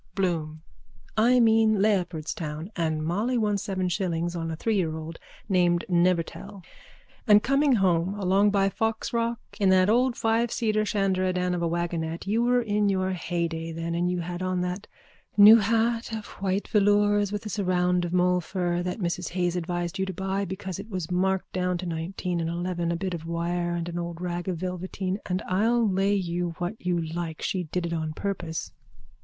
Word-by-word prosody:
BLOOM: 160 -5 -2 0.5
I 240 +3 +4
mean, 220 -2 +4
Leopardstown. 170 -4 -1
And 160 -3 -1
Molly 215 +10 0
won 210 -3 +1
seven 190 -1 -2
shillings 175 -2 -1
on 165 -1 -3
a 160 - -3
three 220 +7 -1
year 160 -4 0
old 160 +1 -7 0.3
named 175 -3 +2
Nevertell 180 +2 0 0.6
and 210 -1 +6
coming 275 +1 +3
home 185 -3 +2
along 195 +2 +3
by 200 -1 +2
Foxrock 230 +3 -1 0.2
in 195 -2 +3
that 190 +2 +5
old 245 +1 +3
fiveseater 225 -1 +1
shanderadan 185 -3 0
of 175 - -2
a 170 - +1
waggonette 170 -1 -2
you 215 +4 +1
were 245 0 +3
in 210 -2 +1
your 190 -1 0
heyday 170 -2 -3
then 165 +1 -4
and 175 +1 0
you 180 -1 -1
had 175 +1 -5
on 185 -1 -1
that 180 +3 -3 0.5
new 210 +2 +10
hat 230 +2 +1
of 220 -2 -5 0.2
white 195 +1 -1
velours 205 -1 +3
with 210 +1 -4
a - - -4
surround 180 -3 +1
of 175 - -3
molefur 180 0 +1
that 180 0 -3
Mrs 175 -3 -2
Hayes 175 -1 0
advised 175 +1 -3
you 190 - 0
to 190 - -4
buy 190 +2 -2
because 190 0 -5
it 210 +3 -8
was 185 -5 -4
marked 190 +1 0
down 180 -1 0
to 180 - -6
nineteen 175 +1 -3
and 165 - -2
eleven, 175 0 -2
a - - 0
bit 185 +1 -3
of 165 -1 -6
wire 175 +1 -1
and 170 0 -3
an 175 0 -4
old 170 -1 -5
rag 175 0 -4
of 180 -2 -1
velveteen, 185 +2 -3
and 185 0 -1
I'll 225 +5 +2
lay 195 +1 +2
you 175 -2 -2
what 175 +2 -2
you 180 -1 +1
like 165 0 -4
she 185 -2 -1
did 170 +3 -3
it 170 - -3
on 160 -1 -2
purpose... 175 -3 -4
180 Hz, 185 wpm, -26 LUFS, 170-205 Hz, 0.6 s, new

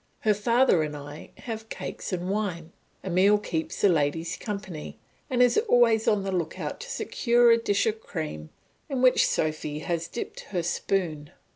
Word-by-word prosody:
Her 215 -2 +3
father 230 -2 +3
and 150 -1 -3
I 145 +1 -10
have 220 -2 -6
cakes - - -6
and 180 -1 -2
wine; 185 -5 -2 0.3
Emile 190 +3 +4
keeps 165 -6 -4
the - - +6
ladies 160 0 0
company 195 -7 -6 0.3
and 250 -2 +4
is 245 - +4
always 230 - +4
on 210 -2 +3
the 195 - -2
look 175 -4 -2
out - - -4
to - - -8
secure 240 -1 +3
a 230 - +6
dish 205 -1 +1
of 220 0 -1
cream 150 - -5 0.4
in 260 -2 -1
which 255 - +5
Sophy 155 -1 -1
has 165 +1 -2
dipped 235 - -6
her 180 -4 -4
spoon. 165 -4 -1
195 Hz, 170 wpm, -26 LUFS, 160-225 Hz, 0.4 s, the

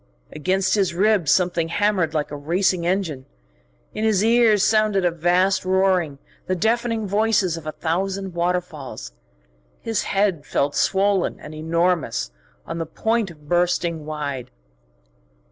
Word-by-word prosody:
Against 185 +5 0
his 195 -5 +1
ribs 200 -4 +2
something 175 0 +2
hammered 185 -3 0
like 150 -2 -1
a - - -4
racing 170 +4 0
engine. 170 -8 -2 0.7
In 215 - -3
his 215 -3 +2
ears 225 -3 +4
sounded 215 -3 +2
a 175 - +3
vast 175 +3 +2
roaring, 185 -5 +1 0.3
the 185 - 0
deafening 230 +2 0
voices 205 -3 +1
of 165 -2 -8
a - - -2
thousand 190 +4 -2
waterfalls. 170 - -3 0.7
His 225 -2 -2
head 195 -6 0
felt 145 0 -1
swollen 195 -1 +1
and 150 - -10
enormous, 165 - 0 0.3
on 170 - -5
the 165 - -3
point 220 +5 -1
of 150 -3 -15
bursting 175 -1 0
wide. 140 -5 -4
180 Hz, 135 wpm, -22 LUFS, 160-200 Hz, 0.7 s, ears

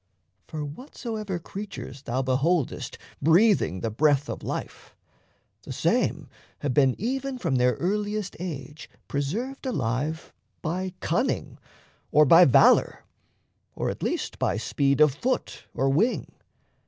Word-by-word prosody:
For 155 -2 -5
whatsoever 215 - -5
creatures 190 -7 -8
thou 130 0 -2
beholdest 140 +4 0 0.2
Breathing 165 - +4
the 115 - -2
breath 145 +4 +2
of - - -5
life, - - -6 0.7
the - - -9
same - - 0 0.3
have 140 -3 -1
been 135 -3 +4
Even 265 +4 -2
from 135 - 0
their 125 -1 +3
earliest 205 - -2
age 150 -3 -7 0.2
preserved 215 - -3
alive 145 - -2 0.3
By 185 +3 -3
cunning, - - -1 0.5
or 150 +1 +6
by 165 +5 +8
valour, 130 - +5 0.7
or - - -1
at - - -9
least - - -2
By 100 - +1
speed 140 +5 +1
of 150 -3 +6
foot 255 - -2
or 135 - 0
wing. 185 - +2
155 Hz, 125 wpm, -26 LUFS, 135-205 Hz, 0.7 s, by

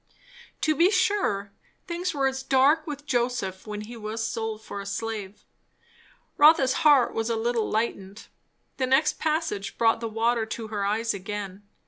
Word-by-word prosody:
To 310 - +2
be 340 +5 +5
sure, 375 - +1 0.3
things 355 +1 -2
were 275 -3 -1
as 265 0 0
dark 275 +4 +3
with 290 -1 -6
Joseph 240 -8 -2
when 210 0 -5
he 225 +3 -9
was 225 0 -4
sold 220 0 -4
for 200 - -6
a - - -9
slave. 210 -1 -5 0.9
Rotha's 290 -3 +6
heart 285 -5 +5
was 225 +1 -2
a 230 - +1
little 230 0 -1
lightened. 210 -2 -3 0.5
The 260 - 0
next 270 +4 +2
passage 310 -11 -2
brought 225 -1 +3
the 230 -1 -4
water 225 +1 0
to 220 0 -6
her 205 -2 -2
eyes 220 +3 0
again. 200 0 -6
230 Hz, 160 wpm, -26 LUFS, 210-275 Hz, 0.9 s, Rotha's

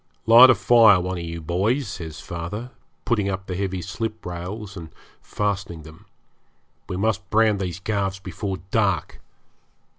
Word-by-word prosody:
'Light 120 +3 +9
a - - +6
fire, 115 -5 +6
one 90 0 -3
of - - -5
you 85 0 -6
boys,' 100 - 0
says 80 -6 -7
father, 95 +8 -6 0.3
putting 105 -4 +1
up 95 0 -4
the 95 - -5
heavy 95 -1 -3
sliprails 105 -2 -6
and 85 -3 -8 0.3
fastening 95 -6 -3
them. 80 +1 -15 0.8
'We 90 - -3
must 100 0 -1
brand 110 -1 +3
these 90 -2 -4
calves 95 -1 -2
before 95 +1 -5
dark. 95 -8 0
95 Hz, 145 wpm, -23 LUFS, 90-110 Hz, 0.8 s, Light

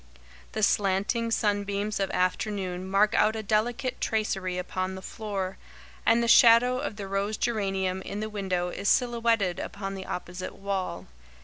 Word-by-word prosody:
The 215 - -2
slanting 205 +4 +1
sunbeams 205 -1 0
of 195 -1 0
afternoon 185 0 -1
mark 205 +3 +3
out 215 +1 +3
a 220 - -4
delicate 235 +5 0
tracery 190 -4 -1
upon 185 +1 -3
the 190 - -7
floor, 195 -4 -4 0.5
and 235 +1 +5
the - - 0
shadow 240 +2 +6
of 265 -6 -4
the 200 -2 -6
rose 200 +2 -1
geranium 195 -5 -1
in 200 - -5
the 215 - -2
window 190 -4 -2
is 200 +3 -2
silhouetted 230 -6 +2
upon 195 -2 -5
the 190 -1 -7
opposite 180 +1 -5
wall. 190 - -3
200 Hz, 150 wpm, -27 LUFS, 190-220 Hz, 0.5 s, shadow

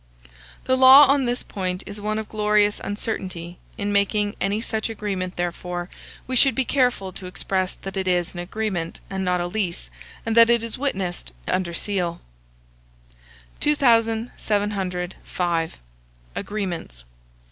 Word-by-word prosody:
The 260 - +3
law 260 +2 +10
on 275 0 +3
this 245 +1 -1
point 185 -1 -3
is 205 0 -8
one 215 +1 -1
of 220 -1 -4
glorious 210 -1 +2
uncertainty; 185 -5 -4 0.2
in 205 -2 -1
making 205 +1 +1
any 200 +2 +1
such 220 0 -2
agreement, 195 -4 -3
therefore, 175 0 -3 0.3
we 255 - -3
should 265 +1 +5
be 265 - +1
careful 245 -9 +1
to 185 - -8
express 185 0 -1
that 195 0 -6
it 190 -1 -2
is 180 -1 +1
an 175 - -6
agreement, 175 -2 -3
and 190 0 -2
not 180 -1 +1
a - - -1
lease; 175 - -2 0.3
and 225 -1 0
that 230 0 +8
it 235 -1 +3
is 230 -1 -4
witnessed 190 - -3
and - - +1
under 170 -2 -4
seal. 180 -4 -2 1.4
2705. 205 - 0 0.6
AGREEMENTS. 175 - -4
200 Hz, 140 wpm, -23 LUFS, 180-225 Hz, 1.4 s, law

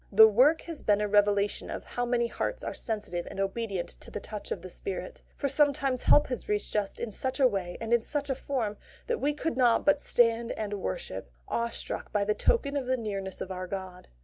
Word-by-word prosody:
The 220 +2 +9
work 255 +9 +5
has 330 -3 -6
been 205 -1 +3
a 210 - +1
revelation 205 0 +2
of - - -5
how 245 0 -3
many 240 -1 +2
hearts - - -3
are - - -3
sensitive 210 -6 -3
and - - -8
obedient 195 -2 -2
to - - -8
the - - -5
touch 210 -1 -7
of 175 - -3
the 185 - -7
Spirit; - - -5 0.2
for 280 - 0
sometimes 280 -3 +2
help 295 - +6
has 250 - -5
reached 210 0 -1
us 205 -2 0
in 235 - -4
such 260 +6 -2
a 270 - +6
way 190 -6 -3
and 230 +1 -1
in 235 - +5
such 285 +3 -2
form 250 -5 -2 0.3
that 475 - -1
we 290 - +2
could 320 +2 -2
not 240 -3 +4
but 290 0 +4
stand 230 -2 +2
and 210 -2 -4
worship, 95 -4 -4 0.2
awestruck 235 0 -3
by 205 - +2
the 210 - +2
token 285 - +1
of 270 -3 -1
the 260 0 +2
nearness 195 -4 -4
of 190 - -4
our 185 0 -4
God. 185 -1 -6
225 Hz, 220 wpm, -29 LUFS, 200-265 Hz, 0.3 s, The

